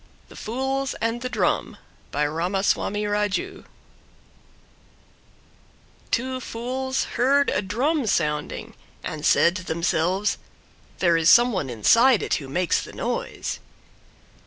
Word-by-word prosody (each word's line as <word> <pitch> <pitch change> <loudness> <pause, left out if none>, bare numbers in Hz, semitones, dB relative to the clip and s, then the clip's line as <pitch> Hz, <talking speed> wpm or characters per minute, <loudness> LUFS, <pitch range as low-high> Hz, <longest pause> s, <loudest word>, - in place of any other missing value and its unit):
THE - - -14
FOOLS 265 +3 -2
AND 230 +1 -1
THE 255 - -3
DRUM - - 0 0.3
By 150 +1 0
Ramaswami 190 +6 0
Raju 210 - -2 2.4
Two 255 +2 -1
fools 260 +3 -3
heard 280 +3 +2
a 185 - +1
Drum 250 - 0
sounding, 150 -6 -1 0.3
and 155 -1 -5
said 170 +2 +4
to 185 - -7
themselves, 175 +4 0 0.6
There 170 -2 +3
is 165 +1 +4
some 240 +3 +7
one 185 - -2
inside 230 - +4
it - - -1
who 135 -3 -2
makes 175 +4 +1
the - - -10
noise." - - -3
210 Hz, 115 wpm, -24 LUFS, 170-255 Hz, 2.4 s, some